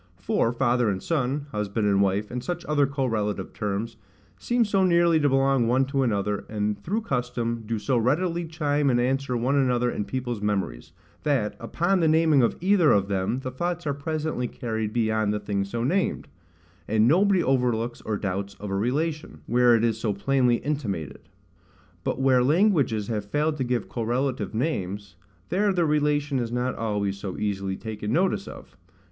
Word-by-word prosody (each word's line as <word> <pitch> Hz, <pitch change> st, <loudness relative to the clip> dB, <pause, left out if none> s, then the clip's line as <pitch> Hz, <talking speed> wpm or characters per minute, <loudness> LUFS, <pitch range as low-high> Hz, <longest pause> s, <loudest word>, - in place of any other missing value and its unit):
For 115 Hz, -, 0 dB
father 120 Hz, -2 st, +1 dB
and 95 Hz, -2 st, -1 dB
son, 140 Hz, -2 st, -1 dB
husband 105 Hz, 0 st, -2 dB
and 100 Hz, -1 st, +3 dB
wife, 100 Hz, +2 st, 0 dB
and 125 Hz, 0 st, -4 dB
such 175 Hz, -1 st, -4 dB
other 145 Hz, -2 st, +2 dB
correlative 110 Hz, -8 st, -2 dB
terms, 105 Hz, +2 st, -3 dB, 0.4 s
seem 240 Hz, -1 st, +1 dB
so 195 Hz, -2 st, +2 dB
nearly 170 Hz, -2 st, +4 dB
to 145 Hz, -1 st, +3 dB
belong 135 Hz, -2 st, +2 dB
one 130 Hz, +3 st, +3 dB
to 135 Hz, 0 st, -1 dB
another, 105 Hz, -4 st, 0 dB
and, 105 Hz, -1 st, -2 dB
through 210 Hz, +6 st, -1 dB
custom, 120 Hz, -, -2 dB
do 115 Hz, 0 st, -1 dB
so 125 Hz, +3 st, 0 dB
readily 170 Hz, +8 st, 0 dB
chime 150 Hz, -3 st, 0 dB
and 120 Hz, -2 st, +2 dB
answer 130 Hz, 0 st, 0 dB
one 125 Hz, +4 st, +1 dB
another 125 Hz, -3 st, +2 dB
in 105 Hz, -, -3 dB
people's 120 Hz, 0 st, -4 dB
memories, 95 Hz, -13 st, -2 dB, 0.3 s
that, 135 Hz, -8 st, 0 dB
upon 180 Hz, +3 st, 0 dB
the 165 Hz, -, +3 dB
naming 160 Hz, -3 st, +4 dB
of 115 Hz, -, +2 dB
either 185 Hz, -4 st, +4 dB
of 100 Hz, 0 st, +2 dB
them, 100 Hz, +6 st, -1 dB
the 130 Hz, -, -5 dB
thoughts 175 Hz, +5 st, -3 dB
are 145 Hz, -, 0 dB
presently 150 Hz, -2 st, -2 dB
carried 110 Hz, -4 st, -3 dB
beyond 110 Hz, -2 st, +1 dB
the 105 Hz, -, -1 dB
thing 100 Hz, -1 st, -2 dB
so 115 Hz, +4 st, -3 dB
named; 180 Hz, +9 st, 0 dB, 0.6 s
and 110 Hz, +1 st, +3 dB
nobody 190 Hz, +5 st, +4 dB
overlooks 120 Hz, -3 st, 0 dB
or 110 Hz, -1 st, -2 dB
doubts 100 Hz, 0 st, -3 dB
of 100 Hz, 0 st, -7 dB
a -, -, -1 dB
relation, 150 Hz, +9 st, -2 dB
where 120 Hz, 0 st, +4 dB
it 115 Hz, -, +1 dB
is 115 Hz, -1 st, +1 dB
so 110 Hz, -2 st, 0 dB
plainly 125 Hz, +4 st, +2 dB
intimated. 115 Hz, -, -4 dB, 0.7 s
But -, -, -2 dB
where 130 Hz, -2 st, +4 dB
languages 145 Hz, -, +2 dB
have 105 Hz, -3 st, -2 dB
failed 150 Hz, +8 st, 0 dB
to 135 Hz, -, -1 dB
give 125 Hz, -3 st, -1 dB
correlative 120 Hz, -2 st, -2 dB
names, 100 Hz, -, -3 dB, 0.3 s
there 200 Hz, +2 st, +2 dB
the 175 Hz, -3 st, +1 dB
relation 145 Hz, -2 st, +1 dB
is 120 Hz, -2 st, -3 dB
not 125 Hz, +1 st, -1 dB
always 100 Hz, -3 st, -2 dB
so 95 Hz, -2 st, -5 dB
easily 100 Hz, -2 st, -2 dB
taken 110 Hz, -2 st, -5 dB
notice 190 Hz, -, +1 dB
of. -, -, -11 dB
125 Hz, 175 wpm, -25 LUFS, 105-150 Hz, 0.7 s, nearly